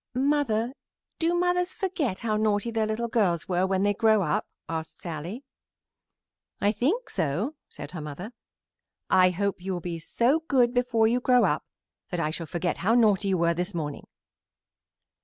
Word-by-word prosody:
"Mother, 255 -4 +1 0.5
do 335 +1 +2
mothers 360 +1 +1
forget 345 - -2
how 220 -2 0
naughty 215 +1 +1
their 220 -1 0
little 220 +2 -1
girls 195 -8 +1
were 185 0 +1
when 190 0 +1
they 205 0 +3
grow 215 -1 +3
up?" 150 -3 0 0.2
asked 160 -1 -5
Sallie. 175 - -6 1.2
"I 205 - +3
think 300 - 0
so," 175 - -1 0.2
said - - -9
her 175 - -6
mother. 150 +9 -7 0.8
"I 185 0 +6
hope 195 +1 -2
you 190 +1 -3
will 180 - -2
be 170 -1 -5
so 240 - +2
good 245 -4 +3
before 245 -3 +2
you 240 +2 +2
grow 250 0 +4
up - - +1 0.5
that 180 - -3
I 155 -2 0
shall 165 0 -5
forget 175 +3 -2
how 215 +7 +2
naughty 210 -4 +4
you 190 -1 +2
were 170 0 +2
this 180 +3 -3
morning." 150 -3 -4
210 Hz, 170 wpm, -27 LUFS, 175-245 Hz, 1.2 s, I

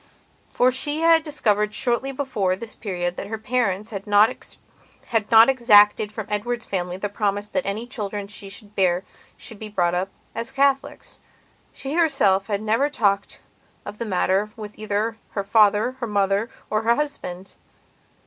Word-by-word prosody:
For 250 +1 +3
she 290 +4 0
had 330 0 +5
discovered 210 -9 0
shortly 255 +2 0
before 255 -9 -1
this 220 +3 -8
period 180 -4 -4
that - - -5
her 220 +1 -4
parents 220 -2 -1
had 200 -1 -6
not 205 +2 +5 0.8
exacted 220 -2 +5
from 215 -1 -6
Edward's 225 +3 -3
family 180 -2 -3
the 205 - -2
promise 205 0 -1
that 270 +4 -3
any 210 +4 -3
children 210 -5 -4
she 200 0 -8
should 205 +1 -9
bear 185 -1 +2 0.3
should 220 - -6
be 215 - -7
brought 175 -4 +1
up 185 +2 -1 0.2
as 230 +3 -3
Catholics. 275 0 0 0.5
She 275 +1 -5
herself 270 - +2
had 205 -1 -2
never 230 +7 +1
talked 200 -8 0 0.4
of 205 +1 -8
the 235 - -3
matter 195 +1 +1
with 210 -1 -9
either 215 +1 -2 0.2
her 200 - -2
father, 210 +2 +3
her 240 - -3
mother, 200 +1 +1 0.2
or 215 0 +1
her 230 +1 +3
husband. 195 -11 -4
210 Hz, 160 wpm, -23 LUFS, 200-240 Hz, 0.8 s, had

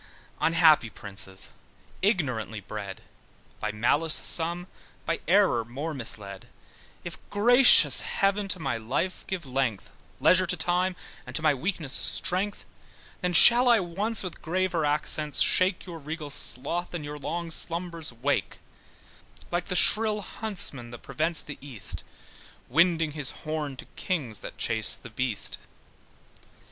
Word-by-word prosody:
Unhappy 160 -7 +3
princes, 95 -2 -6 0.5
ignorantly 125 - -1
bred, 100 -1 -8 0.6
By 105 - -3
malice 140 +9 +2
some, 170 +1 +1 0.4
by 165 - -2
error 185 - +3
more 140 +8 -6
misled, 105 -7 -5 0.6
If - - -8
gracious 245 +5 +7
heaven 200 +1 -1
to 190 -2 -2
my 135 -7 -3
life 140 +11 -3
give 185 -4 -5
length, 130 -6 -3 0.3
Leisure 185 0 +4
to 180 - -2
time, 180 +3 0 0.3
and - - -9
to 160 - 0
my 155 -2 +3
weaknes 150 0 -4
strength, 195 +8 -1 0.6
Then 180 -1 -1
shall 245 +8 +7
I 235 -2 +5
once 200 +5 0
with 180 -3 -8
graver 175 -1 -1
accents 150 0 +1
shake 185 0 +3
Your 170 -3 -9
regal 155 0 -7
sloth, 145 +6 -3
and 155 -4 -6
your 145 0 -8
long 165 +3 -5
slumbers 170 -2 -2
wake: 125 +4 -2 0.9
Like 175 0 -2
the 185 - -3
shrill 210 +3 +5
huntsman 180 - -1
that 120 0 -12
prevents 160 +1 -1
the 150 - -10
east, 130 -7 -4 0.7
Winding 165 +2 +2
his 145 -3 -1 0.2
horn 155 -3 -4
to - - -10
kings 135 - -4
that - - -10
chase 110 -1 +2
the 120 - -13
beast. 110 -3 -3
160 Hz, 135 wpm, -26 LUFS, 130-180 Hz, 0.9 s, gracious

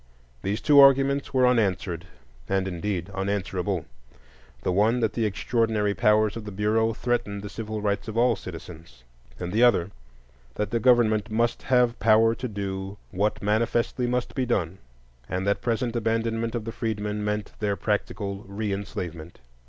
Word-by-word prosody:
These 100 +3 -2
two 145 -2 +6
arguments 140 0 +5
were 130 -1 +3
unanswered, 95 -8 +1 0.4
and 95 0 +1
indeed 95 0 -3
unanswerable: 95 -2 -2 0.8
the - - +1
one 110 +6 +3
that 110 -2 0
the 115 -2 +1
extraordinary 110 -1 0
powers 105 +2 +3
of 115 - -6
the 105 - -7
Bureau 105 +3 +1
threatened 105 -5 -2
the 105 - -7
civil 110 -1 -5
rights 100 +1 -1
of 110 0 -5
all 120 0 +4
citizens; 80 -8 -10 0.4
and 90 +1 -4
the 110 - +2
other 100 -7 +4 0.6
that 105 -1 -2
the 115 - +1
government 115 -2 +3
must 115 +2 0
have 125 -2 +2
power 110 +2 +5
to 125 +2 -4
do 100 -2 -5
what 100 +3 -1
manifestly 115 +3 +1
must 125 0 -1
be 130 -2 -1
done, 95 -6 -1 0.5
and 90 +2 -2
that 100 0 +1
present 120 0 -1
abandonment 115 0 -1
of 115 -2 -3
the 115 - -4
freedmen 105 -2 -3
meant 105 0 -2
their 105 -2 0
practical 100 -1 -2
reenslavement. 95 -5 -5
105 Hz, 155 wpm, -26 LUFS, 100-115 Hz, 0.8 s, two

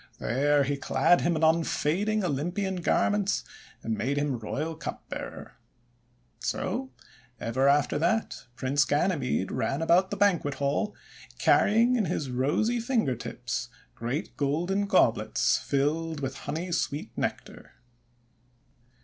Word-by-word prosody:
There 145 +3 +2
he 140 +1 -1
clad 175 +5 +3
him 170 0 +1
in 160 - -1
unfading 170 +6 +2
Olympian 180 +5 -1
garments, 200 +3 +1 0.4
and 115 - -1
made 135 +7 -1
him 145 -4 0
royal 150 +9 -3
cupbearer. 160 - -7 0.9
So 130 - -2 0.5
ever 130 +4 +1
after 145 +1 +3
that 175 - -1
Prince 140 +3 +2
Ganymede 145 - 0
ran 135 - -1
about 170 +3 +3
the 205 - -4
banquet 175 -8 +2
hall 145 +10 -1 0.4
carrying 230 +4 +4
in 215 - +1
his 145 -5 -2
rosy 150 - +1
finger 230 - 0
tips - - -5 0.2
great 125 +7 -4
golden 175 +8 0
goblets 115 - +3
filled 155 +3 -1
with 135 -1 -3
honey 165 +5 -3
sweet 145 -3 -2
Nectar. - - -5
155 Hz, 120 wpm, -28 LUFS, 140-190 Hz, 0.9 s, carrying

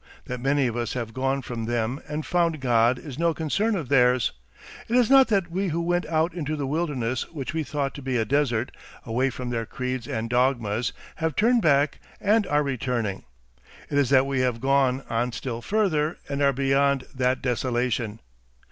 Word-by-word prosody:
That 125 0 -5
many 140 +1 +2
of 120 -2 -1
us 120 -2 -2
have 115 -3 -4
gone 135 +2 -1
from 115 -2 -5
them 120 +3 -1
and 150 +1 -4
found 170 -3 +1
God 120 -1 +3
is 140 0 -9
no 170 -1 +2
concern 205 +8 0
of 165 -8 -3
theirs. 125 -2 +3 0.6
It 235 - +1
is 250 -1 +4
not 270 -1 +7
that 195 -6 0
we 190 +3 -1
who 170 -1 -1
went 175 +1 0
out 160 +2 +1
into 155 -3 -3
the 145 -2 -3
wilderness 135 -5 -2
which 145 -4 -5
we 160 - 0
thought 140 0 -2
to 140 - -8
be 130 -2 -1
a 110 - +1
desert, 130 -2 +1 0.3
away 125 +4 +1
from 125 -1 -5
their 115 -2 -2
creeds 125 -2 -4
and 115 -5 -3
dogmas, 120 -2 +1 0.3
have 160 -2 -1
turned 235 +2 +3
back 145 -3 +3 0.2
and 210 0 +2
are 150 0 +2
returning. 125 -7 -2 0.7
It 145 - +2
is 140 - +2
that 135 -1 +5
we 135 -1 -1
have 125 -2 0
gone 135 0 +2
on 120 +1 -1
still 120 -1 -4
further, 170 - 0
and 140 0 -3
are 140 -1 +5
beyond 135 0 +2
that 130 -1 0
desolation. 120 -3 -1
135 Hz, 190 wpm, -25 LUFS, 125-155 Hz, 0.7 s, not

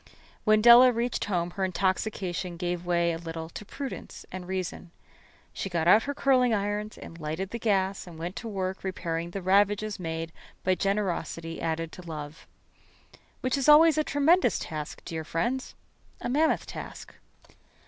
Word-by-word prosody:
When 215 0 +4
Della 240 +2 +9
reached 235 +1 -1
home 175 -3 -1
her 195 - -3
intoxication 185 -1 -1
gave 175 0 -3
way 170 -1 +2
a 165 - -5
little 165 -1 -6
to 190 - -8
prudence 270 +6 -7
and 185 -1 -7
reason. 185 -1 -4 0.6
She 195 - -4
got 170 -2 0
out 210 +5 +7
her 285 0 -3
curling 255 -5 +3
irons 205 +1 -2
and 165 - -10
lighted 160 +5 -4
the 235 - -4
gas 195 -4 0
and 170 -2 -10
went 175 +4 -5
to 230 - -5
work 190 -3 -3
repairing 170 -3 -3
the 190 +1 -6
ravages 205 +2 +2
made 165 -1 -4 0.3
by 185 - +3
generosity 185 -4 -2
added 165 0 -2
to - - -10
love. 155 -2 -8 0.9
Which 255 +1 +1
is 275 - +2
always 315 +2 +8
a 310 - +2
tremendous 310 +6 +3
task, 155 -2 -6
dear 160 -2 -4
friends 240 +12 -2 0.4
a - - -4
mammoth 310 +5 +2
task. - - -8
190 Hz, 160 wpm, -28 LUFS, 170-220 Hz, 0.9 s, Della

